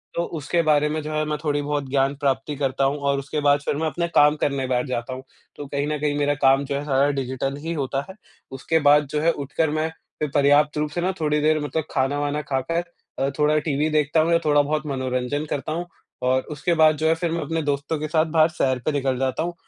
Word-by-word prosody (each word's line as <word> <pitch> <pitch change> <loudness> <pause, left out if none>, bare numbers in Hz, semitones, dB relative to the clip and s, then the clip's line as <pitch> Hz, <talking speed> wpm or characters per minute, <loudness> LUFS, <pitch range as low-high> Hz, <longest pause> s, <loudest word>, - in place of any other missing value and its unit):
तो 170 - 0
उसके 170 +4 0
बारे 150 -1 +3
में 155 0 -2
जो 155 - -5
है 155 0 0
मैं 150 0 -2
थोड़ी 145 -2 0
बहुत 145 -2 -3
ज्ञान 135 0 +1
प्राप्ति 140 0 -1
करता 135 -1 -1
हूँ। 135 +2 +1
और 140 -1 0
उसके 145 +2 -4
बाद 145 0 +4
फिर 145 - -2
मैं 160 +1 0
अपने 170 +3 -2
काम 150 +1 +6
करने 140 -2 0
बैठ 125 0 0
जाता 125 0 -3
हूँ। 130 +1 -8 0.3
तो 145 - -7
कहीं 140 +1 -2
न 150 - -1
कहीं 145 0 0
मेरा 145 0 +2
काम 135 0 +4
जो 140 0 -3
है 140 - -2
सारा 140 0 +2
डिजिटल 135 +1 -2
ही 165 +2 -3
होता 135 -3 -2
है। 190 - -9 0.4
उसके 150 +5 0
बाद 145 0 +5
जो 150 - 0
है 165 +2 +4
उठकर 145 +2 -1
मैं 155 +1 -1 0.3
फिर 150 -2 -1
पर्याप्त 145 +1 +4
रूप 150 0 0
से 175 +4 -3
ना 185 +2 +1
थोड़ी 150 -1 +1
देर 155 +1 +3
मतलब 150 +2 -2
खाना-वाना 145 +2 0
खाकर 145 +4 -2 0.4
अ, 135 - +1
थोड़ा 150 +1 +3
टीवी 150 0 0
देखता 155 +1 +2
हूँ 160 +2 +2
या 170 - +4
थोड़ा 145 -1 +4
बहुत 150 +2 -2
मनोरंजन 130 +1 -2
करता 145 +2 -3
हूँ। 170 +3 -2 0.4
और 130 +1 +2
उसके 150 +4 -1
बाद 155 -1 +5
जो 160 - 0
है 160 - +4
फिर 165 0 -2
मैं 170 0 -1
अपने 165 +2 -2
दोस्तों 145 +1 -1
के 155 - -3
साथ 155 +1 +2
बाहर 160 0 +4
सैर 130 -5 0
पे - - +2
निकल 135 -3 0
जाता 130 +4 -1
हूँ 175 - -3
145 Hz, 245 wpm, -23 LUFS, 140-155 Hz, 0.4 s, काम